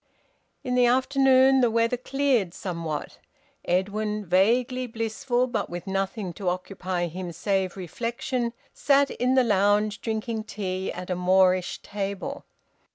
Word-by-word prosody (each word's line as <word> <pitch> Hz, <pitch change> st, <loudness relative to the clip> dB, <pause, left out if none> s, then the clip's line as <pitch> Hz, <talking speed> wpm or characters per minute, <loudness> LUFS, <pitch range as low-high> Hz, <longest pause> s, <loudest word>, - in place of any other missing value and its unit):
In 250 Hz, -, -2 dB
the 250 Hz, -1 st, +4 dB
afternoon 265 Hz, +1 st, +4 dB
the 240 Hz, -, +4 dB
weather 230 Hz, +2 st, +2 dB
cleared 250 Hz, -7 st, 0 dB
somewhat. 165 Hz, -5 st, -5 dB, 0.5 s
Edwin, 210 Hz, +3 st, -1 dB
vaguely 240 Hz, +8 st, +2 dB
blissful, 240 Hz, +3 st, -1 dB
but 240 Hz, -3 st, -3 dB
with 175 Hz, 0 st, -6 dB
nothing 195 Hz, -1 st, -2 dB
to 190 Hz, -1 st, -2 dB
occupy 185 Hz, 0 st, -3 dB
him 175 Hz, +1 st, -5 dB
save 190 Hz, +2 st, -1 dB
reflection, 235 Hz, -, -3 dB, 0.2 s
sat 280 Hz, 0 st, +3 dB
in 255 Hz, +1 st, +1 dB
the 260 Hz, -, +5 dB
lounge 205 Hz, 0 st, +2 dB
drinking 220 Hz, 0 st, -3 dB
tea 190 Hz, -3 st, -3 dB
at 180 Hz, +1 st, -6 dB
a -, -, +1 dB
Moorish 185 Hz, 0 st, +2 dB
table. 200 Hz, +7 st, -5 dB
210 Hz, 130 wpm, -26 LUFS, 185-245 Hz, 0.5 s, the